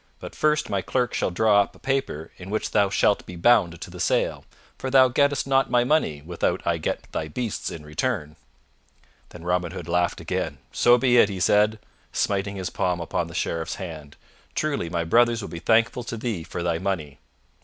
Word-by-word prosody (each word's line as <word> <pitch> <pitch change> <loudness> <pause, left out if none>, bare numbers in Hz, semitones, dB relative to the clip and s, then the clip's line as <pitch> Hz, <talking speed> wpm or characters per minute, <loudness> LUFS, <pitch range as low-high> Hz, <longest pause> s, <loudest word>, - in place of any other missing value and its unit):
But - - -9
first 150 0 +1
my 100 -2 -1
clerk 125 +3 -1
shall - - 0
draw 100 +3 +4
up - - -4
a - - -15
paper 135 - -2
in 90 +1 -9
which 110 +1 -2
thou 100 -2 +3
shalt 100 +1 +2
be 90 - -8
bound 85 -3 +3
to - - -8
the - - -10
sale, - - 0 0.3
for 130 - -3
thou 130 -1 +6
gettest 140 +3 +2
not 135 0 +2
my 120 0 +3
money 120 - +1
without 85 +2 -2
I - - +1
get - - -3
thy 80 - -3
beasts 115 +7 -3
in 75 -2 -8
return." 75 - -2 0.9
Then 85 - -12
Robin 90 -1 -1
Hood 85 -4 -7
laughed 90 0 0
again. 70 - -3
"So 120 0 +5
be 125 0 +3
it," 105 - +6
he 95 -2 -5
said, 105 +4 +3 0.3
smiting 100 0 -1
his 95 -2 -4
palm 90 -1 -1
upon 85 - -2
the - - -10
Sheriff's 80 -1 -2
hand. 80 -5 -8 0.4
"Truly 145 - -1
my 85 0 -1
brothers 115 +5 +3
will - - -6
be 85 - -6
thankful 115 +5 +2
to 115 - -5
thee 110 -6 -3
for 85 +1 -5
thy 85 -1 0
money." 85 -7 -3
100 Hz, 200 wpm, -24 LUFS, 85-120 Hz, 0.9 s, thou